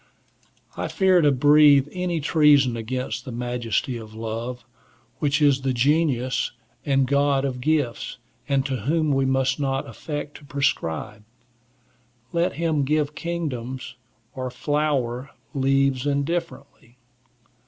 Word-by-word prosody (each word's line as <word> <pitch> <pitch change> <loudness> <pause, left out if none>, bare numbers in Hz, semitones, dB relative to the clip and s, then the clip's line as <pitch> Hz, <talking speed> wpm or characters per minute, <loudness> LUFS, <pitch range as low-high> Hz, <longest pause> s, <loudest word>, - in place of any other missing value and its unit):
I - - -3
fear 190 -3 +3
to 145 -2 +4
breathe 145 +1 +6
any 180 -2 -2
treason 145 -5 +4
against 125 +1 -4
the 130 - -7
majesty 120 0 -2
of 110 -1 -10
love, 115 +2 -5 0.5
which 145 0 +1
is 140 -2 +4
the 135 -1 0
genius 130 -1 +1 0.3
and 135 -2 +2
god 140 0 +2
of 125 -2 -3
gifts, 145 -5 -1 0.3
and 135 -1 +2
to 135 -2 -1
whom 155 +6 0
we 135 -1 +2
must 130 +1 +1
not 135 -1 -1
affect 145 +5 -6
to - - -18
prescribe. 105 - -2 1.1
Let 170 +2 +1
him 160 -3 0
give 150 +1 0
kingdoms 135 -7 -4 0.4
or 130 -1 -4
flower 140 -3 -1 0.2
leaves 135 0 +1
indifferently. 140 -4 -3
135 Hz, 120 wpm, -24 LUFS, 125-150 Hz, 1.1 s, breathe